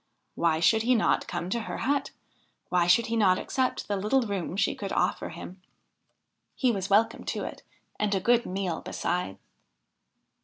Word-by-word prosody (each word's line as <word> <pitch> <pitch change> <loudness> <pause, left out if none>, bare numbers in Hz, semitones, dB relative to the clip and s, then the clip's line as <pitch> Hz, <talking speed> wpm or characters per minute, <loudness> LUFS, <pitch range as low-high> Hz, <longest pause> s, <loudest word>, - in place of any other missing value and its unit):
Why 165 -2 +1
should 220 +7 +4
he 250 +3 +3
not 220 - +1
come 175 +1 -4
to 235 - 0
her 225 - -5
hut? 280 +3 0 0.6
Why 175 -1 +2
should 220 +6 +5
he 230 - -2
not 190 -5 +4
accept 260 +5 -1
the 205 - -1
little 215 +7 +2
room 195 -4 -3
she 200 - +2
could 200 -2 -6
offer - - 0
him? 185 +1 -10 0.9
He 255 -2 +2
was 195 -3 -3
welcome 215 +3 +3
to - - -3
it - - -7 0.4
and 210 -1 +1
a - - +1
good 240 +4 +3
meal 185 -2 -2
besides. 175 - -2
200 Hz, 170 wpm, -27 LUFS, 180-230 Hz, 0.9 s, should